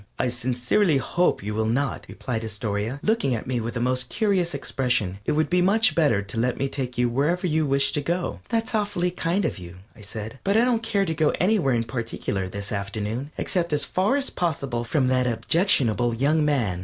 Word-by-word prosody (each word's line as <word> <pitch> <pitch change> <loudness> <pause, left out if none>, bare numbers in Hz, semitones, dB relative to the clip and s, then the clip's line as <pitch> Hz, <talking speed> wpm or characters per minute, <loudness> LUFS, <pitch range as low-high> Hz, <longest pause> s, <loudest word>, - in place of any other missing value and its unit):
"I 125 - 0
sincerely 125 - +1
hope 175 - +1
you 105 +1 -3
will 110 +1 0
not," 135 +5 -1
replied 120 -4 -4
Astoria, 110 +3 -3
looking 215 - +1
at 110 - -5
me 125 -1 -1
with 115 +1 -4
the - - -1
most 125 +1 0
curious 190 -7 +1
expression. 120 -9 -1
"It - - +2
would 155 0 +2
be 180 +2 +2
much 220 +6 +4
better 140 -12 +2
to 100 +3 -4
let 125 +1 0
me 135 - 0
take 130 -3 -4
you 125 0 +3
wherever 150 +10 0
you 160 -3 +1
wish 140 0 +3
to 145 - -1
go." 170 +4 -2
"That's 225 -1 -1
awfully 205 -5 0
kind 180 +2 0
of 150 - -2
you," 85 0 -10 0.2
I - - -15
said, 110 +4 -6
"but 200 +2 +2
I 235 - +5
don't 240 -3 +1
care 215 -3 0
to 165 - -1
go 155 -1 +2
anywhere 180 - +2
in 115 - +1
particular 115 -5 -3
this 100 +1 -6
afternoon, 105 +6 -3
except 170 -4 0
as 150 - +2
far 195 +8 +1
as 280 -1 0
possible 140 -8 -2
from 130 +3 +1
that 125 -1 +2
objectionable 120 - +2
young 150 +6 +2
man." 120 -12 +1
135 Hz, 210 wpm, -24 LUFS, 115-175 Hz, 0.2 s, I